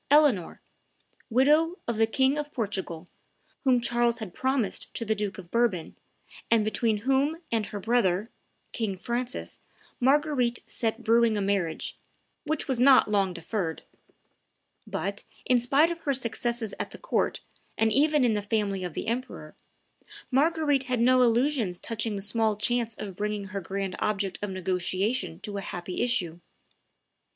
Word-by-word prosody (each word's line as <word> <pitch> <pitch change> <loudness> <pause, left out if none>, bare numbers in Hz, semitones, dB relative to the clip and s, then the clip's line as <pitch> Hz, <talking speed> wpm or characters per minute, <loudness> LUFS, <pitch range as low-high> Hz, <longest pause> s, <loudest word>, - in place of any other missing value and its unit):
Eleanor, 280 - +3 0.7
widow 300 +8 +3
of 235 -2 -1
the 225 0 +4
King 265 +4 +2
of 295 0 -4
Portugal, 190 - -4 0.6
whom 255 -3 +4
Charles 240 0 +1
had 215 -6 -7
promised 260 -5 -1
to 230 - -3
the 220 - +2
Duke 205 -3 -3
of 175 -3 -11
Bourbon, 230 -8 0 0.5
and 225 -2 +4
between 220 0 +1
whom 275 +4 +2
and 220 -3 0
her 210 -2 -5
brother, 210 -3 +1 0.4
King 210 -5 -2
Francis, 240 +5 -4 0.4
Marguerite 265 -2 +2
set 225 0 -2
brewing 230 -1 +4
a - - 0
marriage, 195 -5 -1 0.5
which 310 0 -2
was 260 -3 0
not 255 -4 +6
long 195 -2 +2
deferred. 170 0 -3 1.0
But, - - -3 0.2
in 250 -1 +4
spite 280 +7 +3
of 340 - -5
her 285 -4 0
successes 235 -3 -2
at - - -3
the - - -10
court, - - -1 0.4
and 220 -1 +2
even 295 -1 +4
in 230 - +3
the 210 - 0
family 205 -2 -1
of 175 -3 -4
the - - -4
emperor, 240 +3 -4 0.8
Marguerite 290 0 +2
had 250 -2 -1
no 255 +2 +5
illusions 240 -5 +2
touching 225 0 -2
the 195 - -4
small 220 +1 +1
chance 230 +1 0
of 195 -3 -7
bringing 210 0 -3
her 200 -1 -4
grand 190 +1 -3
object 195 -4 -1
of 205 - -2
negotiation 185 +1 -1
to 205 -1 -5
a - - -3
happy 180 0 -5
issue. 180 -9 0
225 Hz, 155 wpm, -27 LUFS, 200-255 Hz, 1.0 s, not